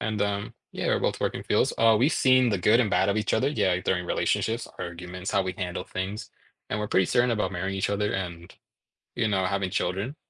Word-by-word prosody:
and, 110 -2 -2
um, 100 0 -2 0.2
yeah, - - -3
we're - - +2
both - - -1
work - - 0
in - - -5
fields, - - +1
uh, 115 -1 +5
we've 140 +7 +3
seen 130 -1 +4
the 100 - +1
good 110 +6 +4
and 110 - +1
bad 100 - +2
of 100 - +1
each 110 - 0
other, 135 - +2
yeah, 95 -11 +1
during 90 -1 0
relationships, 115 +1 0
arguments, 90 +2 -6
how 100 - +2
we 95 0 -3
handle 90 0 -3
things, 95 +3 -5 0.4
and 105 - -1
we're 105 - -2
pretty 95 - +3
certain 120 0 +2
about 105 -4 -1
marrying 95 +2 -3
each 95 - -1
other 105 +1 0
and, 85 -3 -5 0.6
you 115 -2 +1
know, 95 -2 +1
having 95 0 -1
children. 100 - -2
100 Hz, 225 wpm, -26 LUFS, 90-110 Hz, 0.6 s, uh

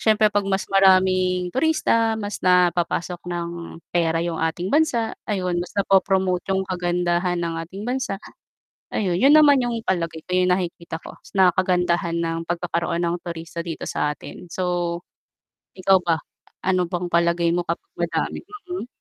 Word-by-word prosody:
siyempre 215 -1 +4
'pag 205 0 +1
mas 195 0 0
maraming 185 -2 +4
turista 230 - +2
mas 205 -1 -4
napapasok 180 -1 +2
ng 170 -1 -3 0.4
pera 165 -1 +2
yung 170 -1 -2
ating 165 +3 -1
bansa, 250 -7 +1
ayun 185 -4 -1
mas 175 - -6
na 200 - +2
po-promote 190 -2 +2
yung 190 0 +1
kagandahan 175 0 0
ng 170 -1 -2
ating 190 +4 -10
bansa. 250 -6 -2 0.8
Ayun, 185 -5 0
'yun 275 +7 +6
naman 290 -3 +7
yung 240 -1 -1
palagay 165 -3 -1
ko - - -10
yung 180 0 +3
nakikita 170 -3 -4
ko - - -10 0.2
na 190 -1 +7
kagandahan 180 -2 +1
ng 165 0 -1
pagkakaroon 170 0 -1
ng 170 0 0
turista 170 0 -6
dito 165 -2 -5
sa 150 - 0
atin. 180 - -11
So 175 -1 -1 0.8
ikaw 190 0 +4
ba? 165 -2 +2 0.5
Ano 185 -1 +2
bang 180 -1 -2
palagay 170 0 +2
mo 175 - +1
kapag 170 - -4
madami, 170 -1 -1 0.3
mm? 360 -9 -4
180 Hz, 155 wpm, -23 LUFS, 170-195 Hz, 0.8 s, naman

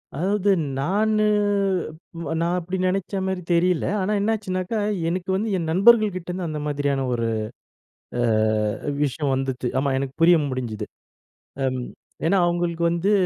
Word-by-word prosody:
அதாவது, 200 +5 +1 0.3
நானு 215 +7 +2 1.1
நான் 170 +2 +1
அப்டி 180 +2 -4
நெனைச்ச 190 +2 -1
மேரி 190 -1 -2
தெரியல. 175 0 +2
ஆனா 190 +3 0
என்னாச்சுனாக்கா, 205 -1 -1 0.3
எனக்கு 185 +2 -3
வந்து 215 +3 -1
என் 165 -2 -2
நண்பர்கள் 215 +2 +5
கிட்டேருந்து 180 0 -4
அந்த 155 -1 -4
மாதிரியான 140 -2 0
ஒரு 115 -1 0 0.9
அ - - +2 0.8
விஷயம் 140 0 0
வந்துச்சு. 130 -2 -2
ஆமா, 140 0 0
எனக்கு 135 0 -3
புரிய 170 0 +7
முடிஞ்சுது. 115 -5 -4 0.8
அம் 130 -1 -1 0.5
ஏன்னா, 195 +3 +3
அவுங்களுக்கு 170 -1 -1
வந்து, 175 +5 +1
175 Hz, 125 wpm, -23 LUFS, 140-190 Hz, 1.1 s, புரிய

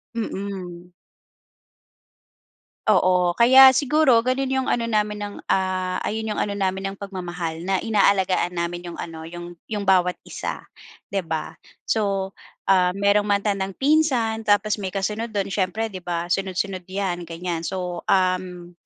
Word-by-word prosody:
Mm. 190 -5 -5 1.9
Oo. 180 -3 +3
Kaya 260 +5 +8
siguro 280 -3 +4
gano'n 260 +2 0
'yong 265 -1 0
ano 235 -1 +1
namin 210 -2 0
ng, 205 0 -5
ah, 185 -1 0
ayon 220 0 -2
'yong - - -3
ano 205 - -1
namin 195 0 -2
ng 195 - -16
pagmamahal, 175 -4 -5
na 190 -1 0
inaalagaan 195 -4 +2
namin 175 0 -3
'yong - - -10
ano 160 -1 -7
'yong 175 +1 -9
'yong 210 -2 -3
bawat 180 -1 +4
isa, - - -5 0.5
'di 195 -3 -2
ba? 160 -1 -4 0.3
So, 195 -3 0 0.4
ah, 180 -2 +4
meron 200 +1 +2
matandang 200 -1 0
pinsan, 260 -7 +1
tapos 205 +1 +2
may 190 -3 -5
kasunod 210 +3 -2
do'n, 200 -2 -1
siyempre, 200 +3 -1
'di 185 -3 -9
ba? 175 0 -3
Sunod-sunod 190 0 -2
'yan 185 -2 -3
ganyan, 170 0 -4
so 180 -2 -4
um, 185 -2 0
195 Hz, 140 wpm, -23 LUFS, 180-210 Hz, 1.9 s, Kaya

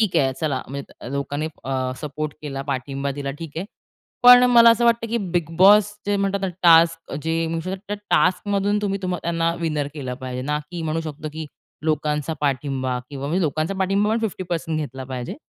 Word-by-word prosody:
...ठीक 215 -5 +2
आहे. 135 -1 +3
चला, 145 -5 -1
म्हणजे 140 -2 -8
लोकांनी 145 +2 -2 0.2
अ, 130 -1 -1
सपोर्ट 150 0 -4
केला, 135 -2 -4
पाठिंबा 140 0 -3
दिला, 140 0 -4
ठीक 165 - -6
आहे. 185 +4 -3 0.6
पण 245 0 +10
मला 235 -1 +8
असं 235 +1 +3
वाटतं 230 0 +3
की 235 +1 0
बिग 170 -3 0
बॉस 205 +2 +7 0.2
जे 205 0 +1
म्हणतात 200 0 0
ना, 190 - 0
टास्क 165 -1 +5
जे, 165 0 0 0.4
तर 205 - -1 0.2
टास्क 185 +3 +2
मधून 205 +1 +1
तुम्ही 200 -1 -1
त्यांना 170 -2 -1
विनर 155 -3 -1
केलं 130 -4 -4
पाहिजे 125 0 -5
ना, 150 +2 -1
की 170 -2 -5
म्हणू 160 +1 -1
शकतो 155 -1 -6
की 160 -1 -6 0.4
लोकांचा 150 0 0
पाठिंबा, 135 -2 -1
किंवा 140 0 -5
म्हणजे 175 +5 0
लोकांचा 155 +5 -1
पाठिंबा 195 +2 +1
पण 225 - +2
50% 175 -6 -3
घेतला 130 -3 -5
पाहिजे. 125 -2 -5
160 Hz, 180 wpm, -22 LUFS, 140-195 Hz, 0.6 s, पण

